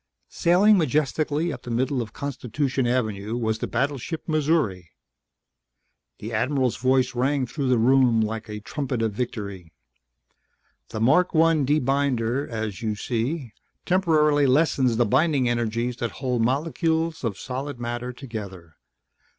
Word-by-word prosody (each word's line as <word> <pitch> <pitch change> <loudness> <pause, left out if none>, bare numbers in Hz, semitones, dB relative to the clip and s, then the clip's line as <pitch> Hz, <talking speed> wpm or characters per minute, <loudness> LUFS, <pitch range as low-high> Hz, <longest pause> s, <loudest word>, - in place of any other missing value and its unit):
Sailing 195 +4 +4
majestically 155 +2 0
up 125 - -8
the - - -9
middle 125 +2 0
of 110 -2 -6
Constitution 135 0 -2
Avenue 110 -3 -1
was 110 -2 -1
the - - -3
battleship 140 +5 -2
Missouri. 150 - 0 1.3
The 110 +2 -7
Admiral's 130 +2 0
voice 130 0 +2
rang 130 +2 +1
through 135 +1 -3
the 125 - +4
room 125 0 +4
like 110 0 -2
a 105 0 -6
trumpet 125 +1 -3
of 110 - 0
victory. 100 -7 -5 1.2
"The 110 - -5
Mark 175 +10 +3
1 160 -3 +3
Debinder, 135 -3 +1
as 110 -2 -4
you 110 -2 -1
see, 120 +3 -3 0.3
temporarily 155 -6 +3
lessens 130 -4 +2
the 120 - +3
binding 135 +3 +2
energies 120 +1 -1
that 120 -3 -3
hold 125 -3 -1
molecules 160 +5 0
of 110 -5 -2
solid 135 +1 -5
matter 120 +1 -4
together. 100 - -9
125 Hz, 135 wpm, -24 LUFS, 115-145 Hz, 1.3 s, Sailing